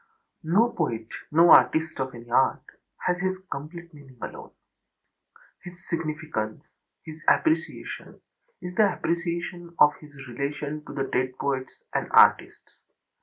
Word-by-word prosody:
No 190 Hz, +9 st, +3 dB
poet, 115 Hz, -, -2 dB, 0.2 s
no 165 Hz, +3 st, +6 dB
artist 155 Hz, +5 st, +5 dB
of 130 Hz, -1 st, -3 dB
any 120 Hz, 0 st, -11 dB
art, 130 Hz, +2 st, +3 dB, 0.4 s
has 180 Hz, 0 st, +1 dB
his 185 Hz, 0 st, -1 dB
complete 170 Hz, +4 st, -7 dB
meaning 135 Hz, -4 st, -16 dB
alone. -, -, -8 dB, 1.1 s
His 175 Hz, 0 st, -12 dB
significance, 155 Hz, -9 st, -3 dB, 0.4 s
his 155 Hz, 0 st, -10 dB
appreciation 320 Hz, 0 st, 0 dB, 0.4 s
is 180 Hz, 0 st, -5 dB
the 200 Hz, -1 st, +3 dB
appreciation 170 Hz, 0 st, -3 dB
of 150 Hz, 0 st, +6 dB
his 150 Hz, -2 st, -15 dB
relation 145 Hz, +4 st, -4 dB
to -, -, -9 dB
the 135 Hz, -, -1 dB
dead 130 Hz, -1 st, -2 dB
poets 135 Hz, -2 st, -3 dB
and -, -, -1 dB
artists. -, -, +4 dB
155 Hz, 125 wpm, -26 LUFS, 135-175 Hz, 1.1 s, no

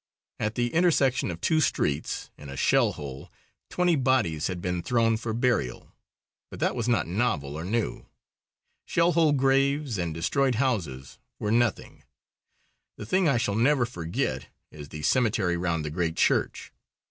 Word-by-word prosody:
At 105 Hz, +1 st, -2 dB
the 120 Hz, -1 st, -1 dB
intersection 160 Hz, -, +2 dB
of 85 Hz, -1 st, -5 dB
two 160 Hz, -1 st, +2 dB
streets, 75 Hz, -, -1 dB
in 75 Hz, -, -11 dB
a 70 Hz, -, -7 dB
shell -, -, +3 dB
hole, 70 Hz, -2 st, -8 dB, 0.4 s
twenty 180 Hz, -1 st, +2 dB
bodies 125 Hz, -, +1 dB
had 90 Hz, -2 st, -4 dB
been 90 Hz, 0 st, -2 dB
thrown 115 Hz, +3 st, +2 dB
for 110 Hz, 0 st, -4 dB
burial. 115 Hz, -, -1 dB, 0.6 s
But -, -, -10 dB
that -, -, 0 dB
was 120 Hz, -1 st, -2 dB
not 120 Hz, -1 st, +2 dB
novel 85 Hz, -, -1 dB
or 80 Hz, -, -5 dB
new. 110 Hz, +5 st, -2 dB, 0.8 s
Shell 170 Hz, +1 st, +2 dB
hole 160 Hz, -2 st, +3 dB
graves 135 Hz, -3 st, +1 dB
and 85 Hz, -2 st, -2 dB
destroyed 125 Hz, -, 0 dB
houses 90 Hz, -, -2 dB, 0.2 s
were 105 Hz, -, -2 dB
nothing. 120 Hz, -2 st, 0 dB, 1.0 s
The -, -, -7 dB
thing 185 Hz, -, +2 dB
I 135 Hz, -, +2 dB
shall 110 Hz, -3 st, 0 dB
never 125 Hz, +4 st, +3 dB
forget 80 Hz, -, -3 dB, 0.2 s
is 75 Hz, -2 st, -10 dB
the 75 Hz, 0 st, -8 dB
cemetery 105 Hz, -, +2 dB
round 85 Hz, -3 st, -1 dB
the 75 Hz, -, -4 dB
great 85 Hz, 0 st, -1 dB
church. -, -, 0 dB
110 Hz, 160 wpm, -26 LUFS, 80-130 Hz, 1.0 s, shell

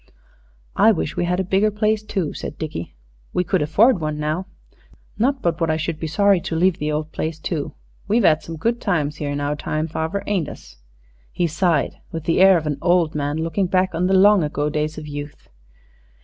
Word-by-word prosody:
"I 220 Hz, -, +6 dB
wish 165 Hz, -6 st, -2 dB
we 175 Hz, -, 0 dB
had 180 Hz, +1 st, 0 dB
a -, -, +1 dB
bigger 195 Hz, +3 st, +2 dB
place, 215 Hz, 0 st, 0 dB
too," 195 Hz, -7 st, -3 dB
said 145 Hz, -, -7 dB
Dickie; 150 Hz, -, -6 dB, 0.4 s
"we 180 Hz, -, +1 dB
could 180 Hz, 0 st, 0 dB
afford 190 Hz, -, +3 dB
one 155 Hz, -1 st, -2 dB
now. 155 Hz, +5 st, -2 dB, 0.7 s
Not 265 Hz, +4 st, +1 dB
but 170 Hz, 0 st, 0 dB
what 165 Hz, -, +1 dB
I 155 Hz, -, +1 dB
should 160 Hz, 0 st, -3 dB
be 160 Hz, -, -3 dB
sorry 195 Hz, +3 st, +3 dB
to 165 Hz, -, -4 dB
leave 180 Hz, +2 st, +2 dB
the 150 Hz, 0 st, -1 dB
old 155 Hz, +1 st, -3 dB
place, 160 Hz, 0 st, -3 dB
too. 155 Hz, -2 st, -4 dB, 0.3 s
We've 220 Hz, 0 st, +2 dB
'ad 155 Hz, 0 st, +4 dB
some 165 Hz, -1 st, -8 dB
good 230 Hz, +8 st, -1 dB
times 155 Hz, -7 st, 0 dB
here 145 Hz, -2 st, -3 dB
in 145 Hz, 0 st, -2 dB
our 145 Hz, +1 st, -1 dB
time, 155 Hz, +1 st, -2 dB
farver, 160 Hz, +5 st, -3 dB
ain't 185 Hz, -8 st, -1 dB
us?" -, -, -12 dB, 0.5 s
He 175 Hz, -, 0 dB
sighed 170 Hz, 0 st, 0 dB
with 165 Hz, -3 st, -5 dB
the 165 Hz, +2 st, +1 dB
air 190 Hz, -1 st, +7 dB
of 160 Hz, -, -4 dB
an 145 Hz, -2 st, -2 dB
old 175 Hz, -3 st, +2 dB
man 145 Hz, 0 st, -2 dB
looking 165 Hz, +4 st, 0 dB
back 185 Hz, +1 st, +1 dB
on 180 Hz, +2 st, 0 dB
the 190 Hz, -, +3 dB
long 200 Hz, -1 st, +6 dB
ago 150 Hz, 0 st, -1 dB
days 155 Hz, +1 st, -2 dB
of 155 Hz, -1 st, -7 dB
youth. 145 Hz, 0 st, -8 dB
165 Hz, 215 wpm, -21 LUFS, 150-190 Hz, 0.7 s, air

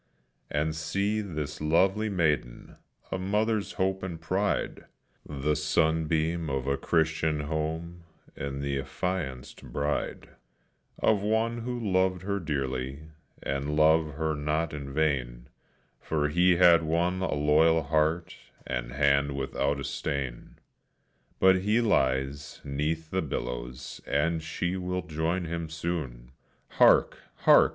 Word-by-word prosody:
And 75 Hz, +2 st, -1 dB
see 100 Hz, +7 st, -1 dB
this 75 Hz, -7 st, -5 dB
lovely 95 Hz, +8 st, +2 dB
maiden, 75 Hz, -10 st, -1 dB, 0.3 s
a 95 Hz, -, -2 dB
mother's 105 Hz, +2 st, 0 dB
hope 95 Hz, 0 st, 0 dB
and 90 Hz, -3 st, -5 dB
pride, 95 Hz, +5 st, -1 dB, 0.4 s
The 75 Hz, +1 st, -1 dB
sunbeam 80 Hz, +1 st, +1 dB
of 65 Hz, -1 st, -2 dB
a 70 Hz, 0 st, +1 dB
Christian 80 Hz, -1 st, +1 dB
home, 80 Hz, +3 st, -3 dB, 0.3 s
and 70 Hz, 0 st, -4 dB
the 70 Hz, -1 st, -1 dB
affianced 70 Hz, -2 st, -4 dB
bride 75 Hz, +1 st, -2 dB, 0.7 s
Of 105 Hz, -3 st, +2 dB
one 110 Hz, +3 st, 0 dB
who 125 Hz, +1 st, -3 dB
loved 95 Hz, -4 st, +1 dB
her 100 Hz, +1 st, -1 dB
dearly, 70 Hz, -2 st, -3 dB, 0.3 s
and 70 Hz, +2 st, -2 dB
loved 80 Hz, -1 st, +4 dB
her 80 Hz, 0 st, 0 dB
not 75 Hz, +2 st, -1 dB
in 70 Hz, -2 st, -6 dB
vain, 65 Hz, -5 st, -1 dB, 0.5 s
For 75 Hz, -2 st, -1 dB
he 90 Hz, +3 st, +4 dB
had 85 Hz, -1 st, +6 dB
won 85 Hz, +3 st, 0 dB
a 95 Hz, -, 0 dB
loyal 80 Hz, +2 st, +4 dB
heart, 80 Hz, +2 st, 0 dB, 0.3 s
and -, -, -3 dB
hand 70 Hz, 0 st, +2 dB
without 70 Hz, +1 st, -1 dB
a -, -, -4 dB
stain; 65 Hz, -4 st, -4 dB, 0.8 s
But 95 Hz, 0 st, +6 dB
he 105 Hz, +5 st, +2 dB
lies 70 Hz, -, 0 dB
'neath 75 Hz, +3 st, -2 dB
the 95 Hz, -, +1 dB
billows, 60 Hz, -3 st, -5 dB
and 80 Hz, +3 st, +1 dB
she 85 Hz, +3 st, -2 dB
will 90 Hz, 0 st, -2 dB
join 85 Hz, +2 st, -1 dB
him 85 Hz, -1 st, -4 dB
soon. 75 Hz, -8 st, -4 dB, 0.4 s
Hark! -, -, +4 dB, 0.3 s
hark! -, -, +7 dB
80 Hz, 125 wpm, -28 LUFS, 70-90 Hz, 0.8 s, hark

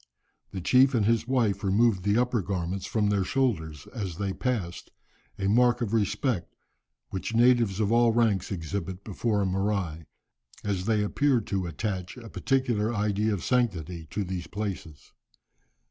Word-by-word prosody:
The 95 Hz, -, -6 dB
chief 130 Hz, +7 st, +4 dB
and 110 Hz, -3 st, +2 dB
his 115 Hz, +1 st, +2 dB
wife 115 Hz, -7 st, +1 dB
removed 100 Hz, +1 st, +3 dB
the 100 Hz, +3 st, +2 dB
upper 125 Hz, -2 st, +1 dB
garments 95 Hz, 0 st, -3 dB
from 105 Hz, -2 st, +1 dB
their 100 Hz, -2 st, +2 dB
shoulders 80 Hz, -, -1 dB
as 95 Hz, -8 st, -4 dB
they 100 Hz, -1 st, -2 dB
passed, 105 Hz, -10 st, -3 dB, 0.5 s
a 95 Hz, -, -1 dB
mark 120 Hz, +3 st, +4 dB
of 115 Hz, -3 st, -2 dB
respect 110 Hz, -, 0 dB, 0.6 s
which 95 Hz, +4 st, -4 dB
natives 115 Hz, -4 st, +4 dB
of 105 Hz, -1 st, +1 dB
all 120 Hz, 0 st, +5 dB
ranks 110 Hz, -5 st, +1 dB
exhibit 95 Hz, +1 st, -4 dB
before 105 Hz, 0 st, -1 dB
a -, -, +1 dB
'morai,' 95 Hz, -4 st, -1 dB, 0.6 s
as 95 Hz, -3 st, -2 dB
they 110 Hz, -1 st, +2 dB
appear 135 Hz, +5 st, +2 dB
to 95 Hz, -3 st, -2 dB
attach 90 Hz, -, -4 dB
a 115 Hz, -2 st, -10 dB
particular 120 Hz, -5 st, 0 dB
idea 105 Hz, 0 st, 0 dB
of 100 Hz, -5 st, -2 dB
sanctity 90 Hz, -, -1 dB
to 105 Hz, -, -2 dB
these 90 Hz, -2 st, -5 dB
places." 90 Hz, -8 st, -6 dB
105 Hz, 155 wpm, -27 LUFS, 95-115 Hz, 0.6 s, all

